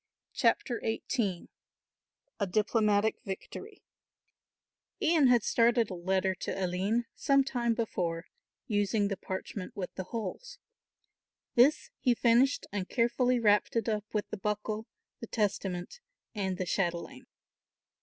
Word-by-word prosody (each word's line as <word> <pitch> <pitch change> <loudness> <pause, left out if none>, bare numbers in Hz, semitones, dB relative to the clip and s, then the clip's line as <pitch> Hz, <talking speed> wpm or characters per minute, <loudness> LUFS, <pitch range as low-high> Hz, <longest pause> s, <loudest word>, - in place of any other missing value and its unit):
CHAPTER 240 - +1
XVIII 220 -4 -1 0.9
A 200 - +1
DIPLOMATIC 215 +1 +2
VICTORY 390 - -7 1.2
Ian 325 -7 +4
had 240 -3 +5
started 230 -2 +3
a - - -3
letter 190 +2 0
to 185 +1 -3
Aline 195 +7 0
some 275 -1 +3
time 240 -3 0
before, 180 -7 -2 0.4
using 205 0 +1
the 200 - -1
parchment 190 0 -6
with 185 -3 -5
the 185 - -5
holes. 225 - -5 1.0
This 260 +6 +4
he 245 -3 +3
finished 245 +4 +3
and 195 -2 -3
carefully 250 +1 +2
wrapped 210 -1 +3
it 230 -1 0
up 215 -2 -1
with 210 -1 -1
the - - -3
buckle, 210 +2 -2 0.3
the 230 - -7
testament 195 - -2 0.3
and 190 -4 -2
the 185 - -2
chatelaine. 175 -1 -2
210 Hz, 125 wpm, -30 LUFS, 190-235 Hz, 1.2 s, had